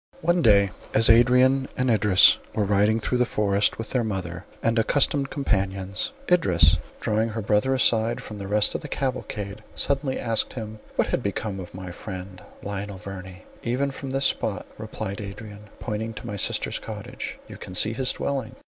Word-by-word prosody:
One 175 +2 +2
day 100 -4 +5 0.2
as 115 +1 +7
Adrian 125 +3 +5
and 125 -1 +2
Idris 105 -1 +6 0.2
were 105 - +1
riding 105 +2 +3
through 125 +3 -1
the - - +5
forest, 105 -3 +1
with 115 - -6
their 125 -2 +1
mother 90 -4 -4 0.2
and 115 0 +2
accustomed 140 +4 +2
companions, 100 - -1 0.2
Idris, 90 - +4 0.2
drawing 110 +1 0
her 110 +1 -4
brother 105 +6 +2
aside 115 -1 +3
from 105 -4 -8
the 100 - -6
rest 105 +1 +3
of - - -3
the 150 - -7
cavalcade, 110 -7 -4
suddenly 140 -1 -1
asked 115 -2 0
him, 110 -3 -7 0.2
"What - - +1
had - - 0
become 100 0 -3
of 90 - -7
his 90 -1 -8
friend, 90 0 -8 0.2
Lionel 100 0 -4
Verney?" 95 -1 -9 0.2
"Even 130 +4 -1
from 135 0 -7
this 135 +1 +1
spot," - - +1
replied 100 +2 -5
Adrian, 105 +1 -9
pointing 110 0 -4
to - - -8
my 105 -3 -4
sister's 100 - -1
cottage, - - -7
"you - - -10
can 90 - -7
see 110 +4 +3
his 130 +2 +1
dwelling." 135 -5 -3
110 Hz, 175 wpm, -25 LUFS, 100-125 Hz, 0.2 s, as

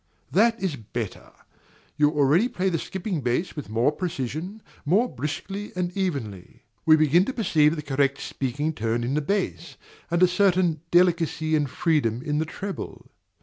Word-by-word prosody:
That 230 +5 +3
is 185 -6 -1
better: 115 -1 -6 0.6
you 150 0 +4
already 150 - +3
play 190 -5 -1
the 165 -3 -1
skipping 190 -2 -4
bass 125 +8 -1
with 150 -7 -6
more 115 +6 +2
precision, 170 - -4 0.2
more 195 +11 +3
briskly 195 +5 -5
and 180 -1 -2
evenly. 135 - -4 0.2
We 155 - +8
begin 155 +3 +4
to 265 - -3
perceive 160 -9 +3
the 150 - -5
correct 140 -1 +1
speaking 145 +4 -2
tone 115 -2 -1
in 125 +3 -1
the 150 - +1
bass, 170 -4 -2 0.3
and 170 +1 +2
a - - +8
certain 180 -4 +2
delicacy 165 -3 +2
and 145 -3 +1
freedom 130 -5 0
in 150 0 -1
the 160 - 0
treble. 195 +4 -7
155 Hz, 160 wpm, -25 LUFS, 140-185 Hz, 0.6 s, We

